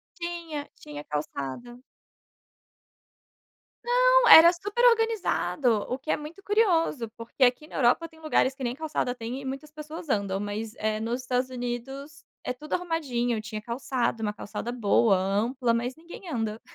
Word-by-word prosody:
Tinha, 340 -4 -5
tinha 145 0 -8
calçada. 150 - -5 2.0
Não, - - +4
era 340 0 +10
super 410 +7 0
organizado, 435 - +2
o 255 - -1
que 275 +4 -4
é - - +1
muito 320 +6 -10
curioso, 335 - +2
porque 230 +3 -2
aqui 250 +5 +2
na - - -12
Europa 270 +6 +3
tem 320 -1 -20
lugares 305 -4 +1
que 270 -1 -9
nem 240 0 -2
calçada 300 -4 -2
tem 245 +3 -5
e - - -9
muitas 275 +3 -6
pessoas 310 +1 -8
andam, 200 -5 0
mas 210 +2 -4
eh, 215 0 -1
nos 235 +3 -2
Estados 255 +1 -1
Unidos 270 +4 -6 0.2
é 250 - -2
tudo 300 +5 -8
arrumadinho, 255 -10 -1
tinha 215 -1 -6
calçada, 235 0 -2
uma 210 -1 -1
calçada 220 +3 -6
boa, 220 -3 +3
ampla 230 +6 0
mas 240 +2 -2
ninguém 345 +4 -11
anda. 225 -4 -3
255 Hz, 155 wpm, -27 LUFS, 230-320 Hz, 2.0 s, era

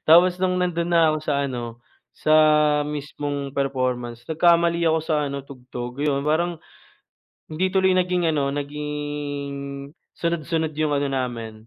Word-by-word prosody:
tapos 175 +3 +6
nung 185 -1 +1
nandun 175 -1 0
na 165 -2 +4
ako - - 0
sa 140 -2 0
ano 120 -3 -5 0.4
sa 155 - +2 0.5
mismong 145 -1 -4
performance 125 -3 -2
nagkamali 170 +1 +3
ako 160 0 +3
sa 160 - 0
ano 140 0 -5
tugtog 125 -1 -8
'yun 140 -1 0
parang, 170 +3 +1 0.9
hindi 175 +4 0
tuloy 190 -1 +3
naging 180 -1 +1
ano 140 -2 +1
naging 145 -1 -4 0.6
sunod-sunod 165 -1 -1
yung 155 -1 +1
ano 140 0 0
namin 120 -4 -3
150 Hz, 135 wpm, -23 LUFS, 140-170 Hz, 0.9 s, tapos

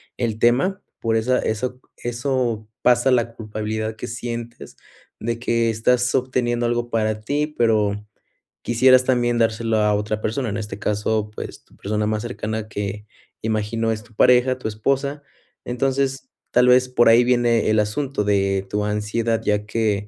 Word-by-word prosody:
el 115 -3 -2
tema, 135 - +2 0.2
por 115 0 +1
esa 125 +3 +1
eso 125 +3 -3 0.2
eso 120 -2 -2 0.2
pasa, 125 +2 +4
la 120 -2 +1
culpabilidad 110 0 -4
que - - -6
sientes, 120 0 -6 0.4
de 115 0 -3
que 115 -1 +1
estás 125 +3 +1
obteniendo 125 -2 0
algo 120 0 -1
para 110 -2 0
ti, 145 +7 -1
pero, 105 -3 +2 0.6
quisieras 130 +2 +4
también 120 -2 +1
dárselo 115 0 +1
a 105 -1 +3
otra 105 +1 -2
persona. 115 +3 -2
En 100 - -3
este 105 -2 -6
caso, 105 0 -1
pues, - - -8
tu - - -24
persona 105 +1 -1
más 110 0 -1
cercana 110 -2 -4
que 105 0 -5 0.4
imagino 110 +1 -1
es 110 0 -7
tu 115 - -21
pareja, 125 +3 +4
tu 130 - -5
esposa. 140 +6 -1 0.4
Entonces 135 +2 -1 0.3
tal 125 0 +4
vez, 125 0 +5
por 120 -2 +4
ahí 115 +2 +6
viene 120 -2 +2
el 110 0 +3
asunto 105 +3 -1
de 100 -1 +1
tu 105 +2 -2
ansiedad, 105 +2 -1
ya 105 0 0
que, 105 -2 -1
115 Hz, 160 wpm, -22 LUFS, 105-125 Hz, 0.6 s, ahí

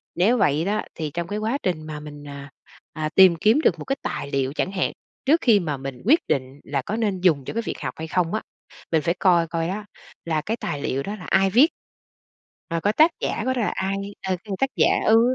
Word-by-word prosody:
Nếu 210 +8 +3
vậy 155 -5 +2
đó, 210 +2 0
thì 155 -2 -4
trong 170 0 -3
cái 205 +3 -3
quá 225 +6 0
trình 170 -4 -1
mà 150 -1 -5
mình, 145 -1 -10
à, 140 0 -8 0.4
à, 155 -1 -2
tìm 190 -3 +8
kiếm 215 - +3
được 170 - +2
một - - -7
cái 270 - 0
tài 140 - -4
liệu 135 0 0
chẳng 185 - -1
hạn, 185 -2 0 0.3
trước 315 +5 +4
khi 225 -5 +5
mà 155 -6 -2
mình 135 -2 -7
quyết 305 +9 +6
định 130 +1 -2
là 140 -1 -2
có 200 +11 -4
nên 205 -5 -1
dùng 155 -8 +3
cho - - -5
cái 230 - -1
việc - - -4
học 125 -3 -3
hay 160 - -5
không 170 +1 0
á, 215 - 0 0.5
mình 160 -2 +3
phải 170 +2 +1
coi 175 -3 +4
coi 165 0 -2
đó 205 +3 -4 0.4
là 160 -2 0
cái 220 +8 -3
tài 145 -10 -4
liệu 135 0 -1
đó 205 - -4
là 180 -4 -10
ai 195 0 +4
viết. 245 +10 +6 1.0
Và 165 - 0
coi 205 +5 +1
tác 315 +7 +5
giả - - -2
của 260 - +1
nó 245 - 0
là 215 - 0
ai, 190 +1 -1 0.3
ờ, 185 - +1
từ 210 - -8
tác 270 - +2
giả - - +4 0.2
ừ, 225 +2 +5
180 Hz, 250 wpm, -23 LUFS, 150-215 Hz, 1.0 s, tìm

